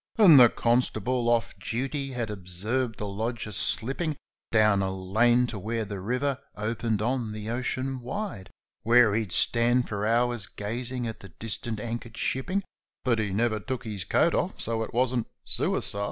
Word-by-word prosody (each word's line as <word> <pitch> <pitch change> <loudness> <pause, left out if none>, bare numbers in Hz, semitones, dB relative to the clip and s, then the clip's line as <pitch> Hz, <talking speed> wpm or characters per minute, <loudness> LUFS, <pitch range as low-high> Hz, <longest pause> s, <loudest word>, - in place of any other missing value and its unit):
And 180 -10 +9
the 120 -2 +9
constable, 120 0 +1
off 120 -1 +1
duty, 135 +6 -3
had 120 -3 -3
observed 105 +6 0
the 105 - -4
lodger 110 +2 -3
slipping 135 +9 0 0.3
Down 105 -3 +4
a 95 - 0
lane 110 +6 +3
to 110 -4 -5
where 110 +3 -2
the 100 -1 -6
river 125 +7 -1 0.2
opened 110 0 -1
on 120 -2 -1
the 110 0 -6
ocean 130 +2 -2
wide, 125 - -5 0.3
Where 115 -1 +5
he'd 110 -4 -1
stand 120 +4 +3
for 105 -1 -3
hours 120 -2 +1
gazing 120 +4 -4
at 110 -1 -5
the 95 - -12
distant 110 +6 -5
anchor'd 115 0 -5
shipping, 185 +10 -1 0.4
But 120 -3 +2
he 105 -2 0
never 110 +3 0
took 130 +4 -4
his 105 -5 -5
coat 165 - +2
off, 185 - -1
so 115 -1 -1
it 110 - -4
wasn't 125 -1 +1 0.2
suicide. 100 - 0
115 Hz, 165 wpm, -27 LUFS, 105-125 Hz, 0.4 s, And